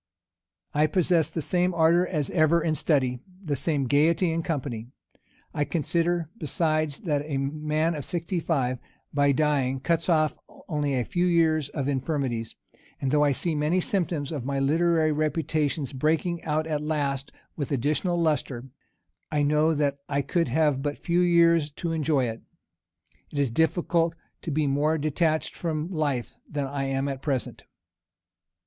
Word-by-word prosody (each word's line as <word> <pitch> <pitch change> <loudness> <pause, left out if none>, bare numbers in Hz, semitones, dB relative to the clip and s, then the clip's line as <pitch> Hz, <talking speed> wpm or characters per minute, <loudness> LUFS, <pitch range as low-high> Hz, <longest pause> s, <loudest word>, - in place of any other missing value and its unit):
I 150 +1 +3
possess 175 -2 +2
the 160 - -4
same 180 +1 +1
ardor 170 +2 +4
as 150 -6 -2
ever 165 0 +4
in 160 - +1
study, 130 -6 +1 0.2
and 185 - -14
the 145 - +1
same 140 +1 -1
gayety 160 +6 +3
in 165 +1 -1
company. 130 -9 -3 0.7
I 145 - 0
consider, 170 +3 0
besides, 155 -2 0
that 150 -5 0
a 140 -3 -2
man 155 +4 0
of 150 -3 -4
sixty 175 +3 -2
five, 130 -7 0 0.3
by 145 0 +3
dying, 140 -3 +1
cuts 165 +5 0
off 155 -2 +3 0.3
only 145 -4 -1
a 125 -2 0
few 180 -1 0
years 160 -4 +2
of 140 -3 -3
infirmities; 130 -5 -2 0.4
and 135 - -1
though 150 0 +4
I 145 - +3
see 165 +5 0
many 155 +4 +1
symptoms 170 -6 -1
of 145 -6 -3
my 140 +2 -2
literary 160 +3 +2
reputation's 155 -1 -1
breaking 160 +5 0
out 155 0 0
at 155 -2 -2
last 140 -3 -2 0.2
with 145 -3 -4
additional 155 +7 0
lustre, 145 -6 0 0.7
I 150 -1 +1
know 150 +2 +3
that 140 -1 0
I 140 0 0
could 170 +1 0
have 145 +1 +2
but 145 0 -2
few 175 0 +1
years 170 -3 +4
to 170 +2 -3
enjoy 155 -4 +1
it. 115 -1 -5 0.9
It - - -8
is 140 -4 +1
difficult 165 +3 +1 0.3
to - - -5
be 155 0 +1
more 145 +3 +1
detached 155 +1 0
from 160 0 -3
life 145 -8 -1 0.2
than 145 -1 -2
I 135 0 -3
am 135 +1 -1
at 135 -1 -4
present. 135 -3 -3
155 Hz, 160 wpm, -26 LUFS, 140-165 Hz, 0.9 s, ardor